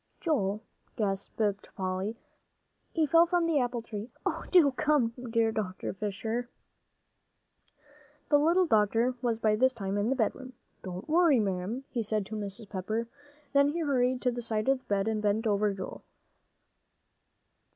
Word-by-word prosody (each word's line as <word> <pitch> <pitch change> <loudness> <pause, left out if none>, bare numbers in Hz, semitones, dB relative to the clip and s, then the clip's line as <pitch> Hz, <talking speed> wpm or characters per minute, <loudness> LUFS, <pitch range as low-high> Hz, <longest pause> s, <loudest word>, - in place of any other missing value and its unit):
"Joel," 215 - 0 0.3
gasped 200 -1 -2 0.4
Polly; 190 +3 -2 0.7
"he 320 -2 +2
fell 330 +3 +5
from 350 -1 +2
the 325 -3 +2
apple 245 -2 -1
tree. 215 0 -6 0.2
Oh, - - -2
do 335 -7 +6
come, 290 -3 +2 0.2
dear 225 -1 +2
Dr. 205 -4 -3
Fisher." 220 +5 -3 1.8
The 290 -1 +5
little 340 +5 +4
doctor 225 -1 +3
was 235 -3 0
by 215 -1 +2
this 260 +4 +3
time 200 -3 -2
in 210 +3 +1
the 265 - +2
bedroom. 255 +2 -2 0.3
"Don't 185 0 -7
worry, 320 -4 +4
ma'am," 200 +5 -2
he 240 - -1
said 215 -2 -1
to 220 - -6
Mrs. 205 +1 -5
Pepper, 215 +4 -3 0.4
then 280 0 +5
he 335 +3 -2
hurried 255 -4 +1
to 250 - +3
the 240 0 -4
side 220 -1 -2
of 270 -1 +3
the - - -32
bed 200 0 0
and 220 -1 0
bent 210 +2 +1
over 210 -1 +2
Joel. 190 -1 -7
225 Hz, 155 wpm, -29 LUFS, 205-265 Hz, 1.8 s, do